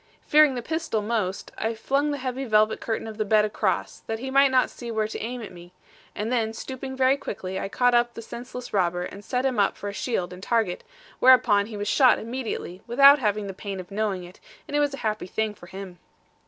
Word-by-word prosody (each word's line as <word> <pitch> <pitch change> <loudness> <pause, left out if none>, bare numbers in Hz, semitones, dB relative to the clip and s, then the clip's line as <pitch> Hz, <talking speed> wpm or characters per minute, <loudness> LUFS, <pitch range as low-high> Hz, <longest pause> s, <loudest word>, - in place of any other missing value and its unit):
Fearing 300 -3 +5
the 245 - -4
pistol 315 -8 -2
most, 210 -4 -2
I 225 +1 -1
flung 275 +6 0
the 290 - -1
heavy 260 0 -3
velvet 215 -3 +2
curtain 225 -1 -2
of 220 -1 -8
the - - +2
bed 215 0 +3
across, 210 - -1
that 225 - -2
he 265 +3 -5
might 275 +1 +5
not 260 -1 +2
see 240 - -8
where 220 -1 0
to 215 - -6
aim 240 +1 -4
at - - -8
me, 175 0 -13 0.4
and 215 +3 -3
then 225 -3 0
stooping 265 +3 -6
very 260 +1 +4
quickly 195 -8 -5
I - - -4
caught 245 +3 +2
up 240 0 +2
the - - -6
senseless 245 +2 -8
robber, 180 -2 +1
and 200 +3 -8
set 250 +4 -1
him 255 -5 0
up 200 - +2
for 205 - -5
a - - -6
shield 185 -6 -2
and 180 - -11
target; 220 -4 0 0.4
whereupon 240 -6 +5
he 220 -2 -7
was 205 0 -3
shot 255 +3 +5
immediately, 230 -6 -5
without 275 +4 +7
having 210 -3 0
the 195 - -5
pain 195 0 -6
of 185 +1 -9
knowing 200 -3 -1
it; 175 +1 -13 0.3
and 290 - -4
a - - +3 0.2
happy 215 -5 -2
thing 220 +3 -1
it - - -12
was - - -24
for 175 - -12
him. 190 -1 -9
220 Hz, 235 wpm, -25 LUFS, 200-255 Hz, 0.4 s, without